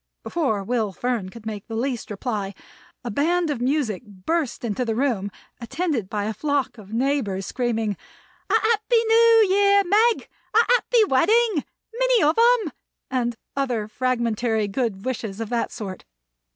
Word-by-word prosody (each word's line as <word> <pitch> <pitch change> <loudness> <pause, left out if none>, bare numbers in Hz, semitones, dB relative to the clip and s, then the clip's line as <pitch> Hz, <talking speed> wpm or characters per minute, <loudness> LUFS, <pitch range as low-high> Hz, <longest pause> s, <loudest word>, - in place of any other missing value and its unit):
Before 245 -12 -1
Will 220 -1 -1
Fern 235 -4 -2
could 225 +2 -13
make 210 -2 -6
the 225 - -5
least 245 +1 -2
reply, 205 -2 -3 0.5
a 240 - -4
band 330 +7 +1
of 240 - -3
music 255 -6 0
burst 240 - -3
into 225 +2 -1
the 225 -2 -1
room, 230 -6 0 0.3
attended 245 - -2
by 210 -1 -2
a 215 +2 -2
flock 275 0 -1
of 205 -1 -13
neighbors, 230 -6 0
screaming: 225 -4 -1 0.5
"A - - 0
Happy 455 +1 +2
New 455 -1 +6
Year, 400 +1 +4
Meg!" 435 +5 +3 0.3
"A 460 - +6
Happy - - +4
Wedding!" 415 - +3 0.3
"Many - - +3
of 305 +2 +3 0.3
'em!" 335 -8 -5 0.4
and 240 -2 0 0.2
other 245 -6 -1
fragmentary 230 -2 0
good 200 -2 -2
wishes 225 -5 -4
of 225 -2 -4
that 235 -1 -1
sort. 195 -5 -7
250 Hz, 150 wpm, -23 LUFS, 215-340 Hz, 0.5 s, New